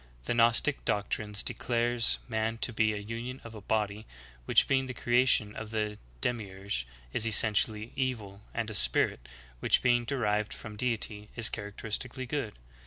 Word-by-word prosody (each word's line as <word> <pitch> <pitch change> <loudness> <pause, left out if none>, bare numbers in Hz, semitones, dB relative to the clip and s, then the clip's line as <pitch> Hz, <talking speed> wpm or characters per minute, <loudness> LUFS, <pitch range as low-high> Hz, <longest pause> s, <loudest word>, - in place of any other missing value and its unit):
The - - -1
Gnostic 120 +5 +3
doctrine 105 0 -1
declares 120 0 +1
man 110 -1 -1
to 120 - +1
be 110 0 +2
a 105 - -3
union 115 +5 -6
of 115 - -10
a 105 - -9
body, 105 +1 -2 0.4
which, - - +4
being 135 -1 +1
the 125 - -6
creation 120 -4 +3
of 110 - -6
the 105 -1 -2 0.2
Demiurge, 95 - -2 0.3
is 115 - +1
essentially 110 0 +3
evil, 110 -7 -3
and 115 -2 -3
a - - -6
spirit, - - +4 0.3
which, - - +3
being 120 -1 +3
derived 105 -5 -1
from 110 -1 -9
Deity, 105 -2 -1
is 115 -2 +3
characteristically 110 +5 -4
good. 125 -6 -4
110 Hz, 155 wpm, -30 LUFS, 105-120 Hz, 0.4 s, which